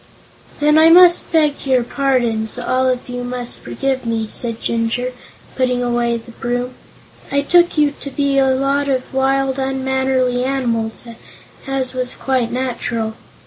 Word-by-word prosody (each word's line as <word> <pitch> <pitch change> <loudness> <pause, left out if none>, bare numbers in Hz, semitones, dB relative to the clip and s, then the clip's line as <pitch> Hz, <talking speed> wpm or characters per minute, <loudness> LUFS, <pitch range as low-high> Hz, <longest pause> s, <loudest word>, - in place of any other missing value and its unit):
"Then 300 +1 +4
I 320 +1 +7
must 350 +1 +6
beg 305 -3 +2
your 260 -3 +2
pardons; 240 -4 0
all 255 +1 0
of 250 -1 -1
you 245 0 -5
must 245 -1 -6
forgive 260 - -2
me," 230 -1 -1
said 230 +1 -4
Jinjur, 230 +2 -1 0.4
putting 250 -1 0
away 240 -1 0
the 230 +1 -12
broom. 245 +2 -3 0.6
"I 280 0 +2
took 345 +3 +3
you 295 -1 +3
to 280 - -5
be 280 0 +1
a 270 - +3
lot 275 +2 +1
of 260 -1 -2
wild, 270 0 +1
unmannerly 265 -1 0
animals, 235 -4 -1 0.6
as 265 -1 -2
was 255 -1 -3
quite 255 -3 -1
natural. 245 -3 -2
255 Hz, 145 wpm, -18 LUFS, 245-275 Hz, 0.6 s, I